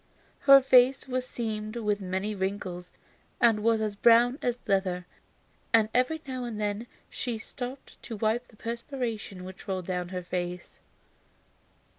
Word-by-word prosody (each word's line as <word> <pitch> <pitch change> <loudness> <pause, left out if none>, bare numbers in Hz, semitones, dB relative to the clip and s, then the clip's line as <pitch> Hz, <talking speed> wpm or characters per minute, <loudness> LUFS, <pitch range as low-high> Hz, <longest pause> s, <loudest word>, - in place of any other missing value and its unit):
Her 275 0 +11
face 260 0 +5
was 255 0 -2
seamed 215 -2 -4
with 210 -3 -1
many 190 +3 -2
wrinkles, 190 -2 -4 0.5
and 230 -3 +5
was 225 +1 +2
as 210 -1 -1
brown 240 +5 +5
as 245 -1 0
leather, 190 -3 0 0.7
and 220 -1 +5
every 255 +6 +2
now 255 -1 -4
and 230 -3 -5
then 210 +2 -2 0.2
she 240 -3 -3
stopped 250 +4 -8
to 230 - -6
wipe 225 +3 0
the 225 - -20
perspiration 230 -5 -4
which 185 +2 -10
rolled 185 -2 -2
down 180 -1 -3
her 180 -1 -4
face. 180 0 -5
220 Hz, 145 wpm, -28 LUFS, 190-245 Hz, 0.7 s, Her